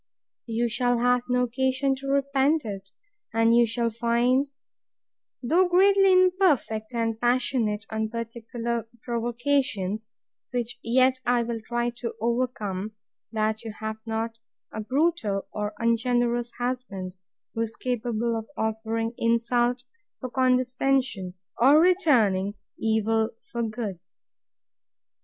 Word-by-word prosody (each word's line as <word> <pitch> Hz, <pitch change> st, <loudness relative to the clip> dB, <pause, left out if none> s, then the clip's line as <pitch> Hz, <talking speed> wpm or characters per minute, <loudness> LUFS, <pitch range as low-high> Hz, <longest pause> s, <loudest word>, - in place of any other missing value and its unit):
You 230 Hz, +1 st, 0 dB
shall 245 Hz, +1 st, +1 dB
have 245 Hz, +1 st, +3 dB
no 250 Hz, 0 st, +2 dB
occasion 260 Hz, +2 st, +1 dB
to 275 Hz, +1 st, -8 dB
repent 280 Hz, +1 st, +2 dB
it: 195 Hz, -2 st, -6 dB, 0.5 s
And 225 Hz, +1 st, +4 dB
you 235 Hz, 0 st, +5 dB
shall 230 Hz, +1 st, -1 dB
find, 240 Hz, +4 st, +2 dB, 0.9 s
though 345 Hz, +9 st, +3 dB
greatly 390 Hz, +2 st, +5 dB
imperfect, 360 Hz, -, +3 dB
and 225 Hz, -1 st, -1 dB
passionate, 240 Hz, -3 st, +1 dB
on 220 Hz, 0 st, -1 dB
particular 230 Hz, 0 st, -4 dB, 0.2 s
provocations, 235 Hz, -3 st, -1 dB, 0.4 s
(which 245 Hz, -1 st, -3 dB
yet 255 Hz, +2 st, +3 dB
I 245 Hz, -1 st, +2 dB
will 230 Hz, -1 st, -4 dB
try 240 Hz, +1 st, -1 dB
to 235 Hz, -3 st, -5 dB
overcome,) 220 Hz, -4 st, -2 dB, 0.4 s
that 220 Hz, 0 st, -1 dB
you 225 Hz, -2 st, -6 dB
have 220 Hz, 0 st, -4 dB
not 225 Hz, 0 st, -3 dB, 0.3 s
a 220 Hz, -, -3 dB
brutal 255 Hz, -5 st, 0 dB
or 210 Hz, 0 st, -3 dB
ungenerous 235 Hz, +1 st, +1 dB
husband, 245 Hz, -7 st, -4 dB, 0.4 s
who 225 Hz, -, -2 dB
is 225 Hz, 0 st, -3 dB
capable 235 Hz, -2 st, -1 dB
of 225 Hz, 0 st, -4 dB
offering 225 Hz, +1 st, -2 dB
insult 240 Hz, +2 st, +1 dB, 0.4 s
for 255 Hz, -, -6 dB
condescension, 255 Hz, -6 st, +1 dB, 0.2 s
or 275 Hz, +6 st, +7 dB
returning 235 Hz, -, +3 dB, 0.2 s
evil 220 Hz, 0 st, +1 dB, 0.2 s
for 235 Hz, -, -2 dB
good. 215 Hz, -5 st, -3 dB
235 Hz, 115 wpm, -26 LUFS, 220-255 Hz, 0.9 s, or